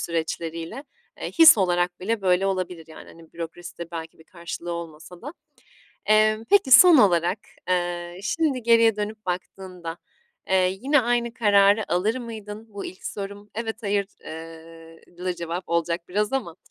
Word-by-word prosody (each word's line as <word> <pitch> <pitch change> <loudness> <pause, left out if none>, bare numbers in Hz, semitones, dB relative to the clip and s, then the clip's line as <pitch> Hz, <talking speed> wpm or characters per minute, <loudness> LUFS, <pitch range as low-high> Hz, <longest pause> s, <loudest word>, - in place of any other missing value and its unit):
süreçleriyle. 165 - -4 0.4
Eee, - - -4
his 320 - +8
olarak 175 -1 0
bile 220 +3 -1
böyle 185 +1 +2
olabilir 185 -3 -3
yani, 160 - -12
hani, 165 -1 -16
bürokraside 170 +1 -8
belki 165 -1 -7
bir 160 - -18
karşılığı 170 0 -7
olmasa 170 +2 -9
da. 290 - -7 0.7
Emm, 215 +1 +3
peki, 390 -9 +4
son 330 +6 +9
olarak, 180 -3 +3 0.3
eee, 175 0 -2
şimdi 280 +1 -1
geriye 230 -1 +4
dönüp 210 0 -5
baktığında, 180 -2 -6 0.5
eee, 185 0 +2
yine 285 +2 +3
aynı 240 0 -1
kararı 205 -3 +3
alır 210 +7 +1
mıydın? 220 -2 -9
Bu 200 - -7
ilk 185 - -10
sorum. 200 +1 -7
Evet, 225 0 -5
hayır, 200 -1 0 0.2
eee, 165 0 -11 0.2
lıı, 180 0 -2
cevap 170 +1 -5
olacak 170 0 -1
biraz 210 +4 -1
ama, 210 -11 -3
185 Hz, 145 wpm, -24 LUFS, 170-220 Hz, 0.7 s, son